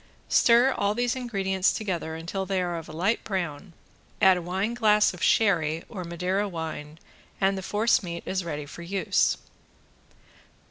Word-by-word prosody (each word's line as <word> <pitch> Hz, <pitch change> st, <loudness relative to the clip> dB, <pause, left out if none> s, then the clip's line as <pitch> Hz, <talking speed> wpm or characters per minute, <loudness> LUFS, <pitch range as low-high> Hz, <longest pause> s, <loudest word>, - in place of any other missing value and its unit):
Stir 240 Hz, +3 st, +5 dB
all 200 Hz, +1 st, 0 dB
these 245 Hz, +1 st, 0 dB
ingredients 195 Hz, -7 st, 0 dB
together 175 Hz, -6 st, -3 dB
until 170 Hz, +4 st, -4 dB
they 195 Hz, -1 st, 0 dB
are 175 Hz, -1 st, -1 dB
of 165 Hz, -1 st, -7 dB
a -, -, -7 dB
light 185 Hz, +8 st, 0 dB
brown, 175 Hz, -3 st, -4 dB, 0.5 s
add 190 Hz, -1 st, +6 dB
a 180 Hz, -, -3 dB
wine 190 Hz, +6 st, -2 dB
glass 210 Hz, -4 st, +3 dB
of 180 Hz, -, -11 dB
sherry 165 Hz, -7 st, +2 dB
or 190 Hz, -5 st, -6 dB
Madeira 180 Hz, +4 st, -1 dB
wine, 160 Hz, -3 st, -6 dB, 0.4 s
and 195 Hz, 0 st, +2 dB
the 190 Hz, -, -4 dB
force 210 Hz, +4 st, +2 dB
meat 170 Hz, -3 st, -6 dB
is 190 Hz, -1 st, -2 dB
ready 150 Hz, -3 st, -4 dB
for 150 Hz, -, -10 dB
use. 190 Hz, +3 st, +1 dB
190 Hz, 165 wpm, -26 LUFS, 170-205 Hz, 0.5 s, add